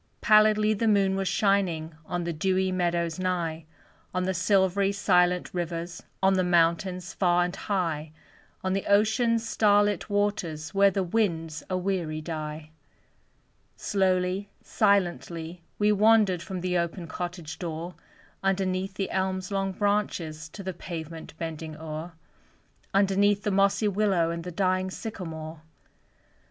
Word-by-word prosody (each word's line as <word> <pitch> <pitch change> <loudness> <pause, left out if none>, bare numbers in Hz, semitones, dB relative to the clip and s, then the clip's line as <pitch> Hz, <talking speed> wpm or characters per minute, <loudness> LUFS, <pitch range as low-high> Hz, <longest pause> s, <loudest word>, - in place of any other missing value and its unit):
Pallidly 215 0 +5
the 225 +2 0
moon 200 -2 +3
was 195 0 -1
shining 180 -7 +1
On 175 -1 -2
the 170 0 -2
dewy 185 +3 +1
meadows 170 -2 0
nigh; 170 -3 -2 0.5
On 185 - +1
the 190 +1 0
silvery, 195 +1 +2
silent 180 -3 +2
rivers, 170 -1 -4 0.2
On 190 0 +5
the 185 -1 +2
mountains 180 +2 +1
far 175 -2 +3
and 180 - -4
high 165 -6 -2 0.5
On 185 0 0
the 195 - -2
ocean's 225 +3 +3
star 205 -2 +4
lit 205 -2 -2
waters, 190 -6 -1
Where 200 0 +5
the 195 0 -1
winds 165 -6 -1
a 185 - 0
weary 180 -4 -2
die. 155 -1 -6 1.0
Slowly, 190 0 0
silently 175 -4 0 0.2
we 210 0 +3
wandered 210 -3 +4
From 185 -1 -5
the 180 -1 0
open 170 +1 -3
cottage 175 -1 -6
door, 170 0 -5 0.5
Underneath 190 0 -1
the 195 -1 -3
elm's 190 0 -1
long 195 -1 0
branches 185 -6 -1
To 195 - -9
the 190 0 -4
pavement 165 -2 -8
bending 160 -1 -5
o'er; 160 +2 -6 0.8
Underneath 200 +1 +3
the 210 - 0
mossy 200 +2 +3
willow 195 -5 +1
And 170 0 -4
the 180 - -5
dying 185 +1 0
sycamore. 165 -7 -7
185 Hz, 135 wpm, -27 LUFS, 170-200 Hz, 1.0 s, Pallidly